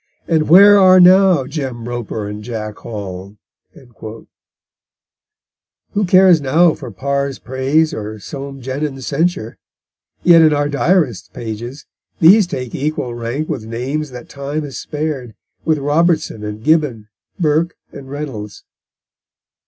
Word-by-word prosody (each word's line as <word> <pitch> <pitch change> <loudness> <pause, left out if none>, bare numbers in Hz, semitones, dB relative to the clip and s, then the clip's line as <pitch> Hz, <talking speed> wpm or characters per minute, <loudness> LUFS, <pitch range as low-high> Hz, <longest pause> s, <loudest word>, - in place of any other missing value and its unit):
And 160 -3 +1
where 200 +4 +8
are 185 -1 +6
now 185 -5 +5
Jem 130 -5 -5
Roper 115 -3 -5
and 105 +1 -7
Jack 110 -2 -6
Hall?_ 100 -2 -8 2.5
Who 205 0 0
cares 185 -3 +5
now 160 +5 +3
for 130 -5 -9
Parr's 140 +4 -3
praise 135 +5 0
or 110 0 -5
Soame 135 +4 -8
Jenyns' 135 0 -4
censure? 145 -7 -2 0.6
Yet 170 -2 +7
in 155 -1 +5
our 145 0 0
Diarist's 145 - 0
pages 120 +5 -7 0.3
these 190 +4 +6
take 125 -9 -6
equal 140 -4 -3
rank 120 +6 -4
with 110 -3 -5
names 135 +6 -4
that 125 -1 -10
time 145 +2 -5
has 140 -3 -7
spared, 145 -7 -5 0.3
with 160 -1 +2
Robertson 150 -5 0
and 105 +1 -7
Gibbon, 145 -9 +1 0.3
Burke 165 +1 +1 0.2
and 135 -1 -11
Reynolds. 130 -9 -7
140 Hz, 125 wpm, -17 LUFS, 120-160 Hz, 2.5 s, where